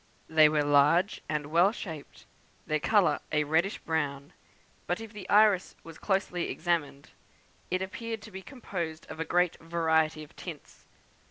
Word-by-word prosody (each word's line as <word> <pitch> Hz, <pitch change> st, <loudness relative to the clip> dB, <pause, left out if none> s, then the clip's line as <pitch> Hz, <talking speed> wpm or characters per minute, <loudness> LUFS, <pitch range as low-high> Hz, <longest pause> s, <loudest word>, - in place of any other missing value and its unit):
They 155 Hz, -1 st, +6 dB
were 150 Hz, -1 st, +1 dB
large 145 Hz, +7 st, +3 dB
and 150 Hz, -1 st, -2 dB
well 175 Hz, +5 st, +5 dB
shaped; 160 Hz, -9 st, -9 dB, 0.4 s
their 155 Hz, 0 st, 0 dB
colour 200 Hz, +4 st, +3 dB
a 150 Hz, -1 st, +2 dB
reddish 160 Hz, +7 st, +1 dB
brown; 145 Hz, -3 st, -3 dB, 0.5 s
but 175 Hz, -, -1 dB
if 225 Hz, -1 st, -9 dB
the 200 Hz, -3 st, -9 dB
iris 205 Hz, -3 st, +4 dB
was 165 Hz, -1 st, -12 dB
closely 190 Hz, -3 st, -1 dB
examined, 160 Hz, -5 st, -2 dB, 0.6 s
it 185 Hz, +1 st, 0 dB
appeared 225 Hz, +3 st, -6 dB
to 215 Hz, -, -11 dB
be 190 Hz, 0 st, -7 dB
composed 175 Hz, -, -6 dB
of 155 Hz, -, -8 dB
a 160 Hz, -, -1 dB
great 180 Hz, -1 st, +1 dB
variety 160 Hz, -2 st, 0 dB
of 150 Hz, -, -16 dB
tints. -, -, -10 dB
165 Hz, 155 wpm, -29 LUFS, 155-190 Hz, 0.6 s, They